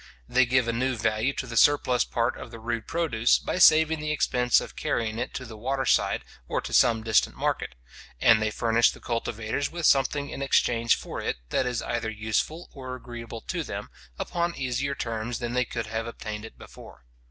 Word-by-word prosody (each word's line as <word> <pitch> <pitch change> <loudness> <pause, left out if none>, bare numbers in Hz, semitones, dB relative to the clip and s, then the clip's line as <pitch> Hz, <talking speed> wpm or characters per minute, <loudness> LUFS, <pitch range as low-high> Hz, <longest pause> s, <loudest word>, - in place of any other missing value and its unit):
They 125 0 +3
give 125 -1 +2
a 115 - 0
new 130 +2 0
value 110 +3 0
to 140 -1 -4
the 115 -2 -7
surplus 130 -1 +4
part 115 0 0
of - - -9
the 115 - -9
rude 115 0 -4
produce, 150 -9 +2
by - - -3
saving 160 -1 +6
the 150 0 -3
expense 125 -5 +2
of - - -8
carrying 115 -1 -1
it 120 - -3
to 130 - -5
the 110 -2 -9
water 130 +5 -2
side, - - +2 0.2
or - - -1
to - - -6
some 115 -3 +4
distant 110 -1 +2
market; 60 - -2 0.4
and 115 - +5
they 110 - +1
furnish 115 +1 +3
the - - -8
cultivators 115 +2 -2
with 170 -1 -3
something 140 +1 +2
in - - -6
exchange 115 -4 +3
for - - -6
it - - -2
that 130 - +1
is 125 -1 -2
either 120 -2 -2
useful 110 +10 -2
or 130 -2 -6
agreeable 120 -2 -8
to - - -3
them, - - -6 0.3
upon 170 0 -2
easier 135 +2 -2
terms 115 0 -3
than 120 -1 -4
they 125 0 +2
could 115 -1 -4
have 115 +1 -3
obtained 110 -2 -6
it 110 - -12
before. - - -14
120 Hz, 200 wpm, -26 LUFS, 115-135 Hz, 0.4 s, saving